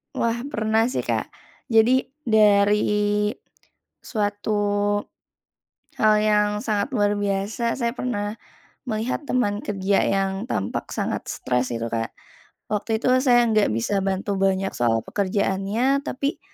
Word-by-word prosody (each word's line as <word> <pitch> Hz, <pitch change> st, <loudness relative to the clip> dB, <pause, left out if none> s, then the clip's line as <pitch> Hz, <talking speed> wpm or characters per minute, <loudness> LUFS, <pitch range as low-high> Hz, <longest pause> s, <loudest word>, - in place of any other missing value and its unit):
Wah, 235 Hz, +1 st, -1 dB
pernah 220 Hz, 0 st, +1 dB
sih, -, -, -1 dB
Kak. -, -, -1 dB, 0.4 s
Jadi, 235 Hz, +4 st, +5 dB, 0.2 s
dari 210 Hz, -1 st, +3 dB, 0.7 s
suatu 205 Hz, -1 st, -2 dB, 1.5 s
hal 215 Hz, -1 st, +5 dB
yang 210 Hz, -1 st, +3 dB, 0.2 s
sangat 210 Hz, -3 st, 0 dB
luar 205 Hz, -1 st, +2 dB
biasa, 205 Hz, +4 st, -1 dB
saya 235 Hz, -3 st, -1 dB
pernah 210 Hz, -5 st, -3 dB, 0.6 s
melihat 225 Hz, +6 st, -2 dB
teman 215 Hz, -7 st, 0 dB
kerja 195 Hz, -1 st, +1 dB
yang 195 Hz, -1 st, +1 dB, 0.2 s
tampak 95 Hz, -, -3 dB
sangat -, -, -2 dB
stres 125 Hz, 0 st, -1 dB
itu, 115 Hz, 0 st, -2 dB
Kak. 115 Hz, -1 st, -3 dB, 0.6 s
Waktu 215 Hz, +1 st, 0 dB
itu -, -, -2 dB, 0.2 s
saya 240 Hz, -2 st, +5 dB
nggak 215 Hz, -2 st, +3 dB
bisa 195 Hz, -, 0 dB
bantu 195 Hz, +1 st, -1 dB
banyak 195 Hz, 0 st, +1 dB
soal 115 Hz, -2 st, +2 dB
pekerjaannya, 200 Hz, +7 st, 0 dB
tapi 280 Hz, 0 st, -3 dB
210 Hz, 120 wpm, -23 LUFS, 195-225 Hz, 1.5 s, Jadi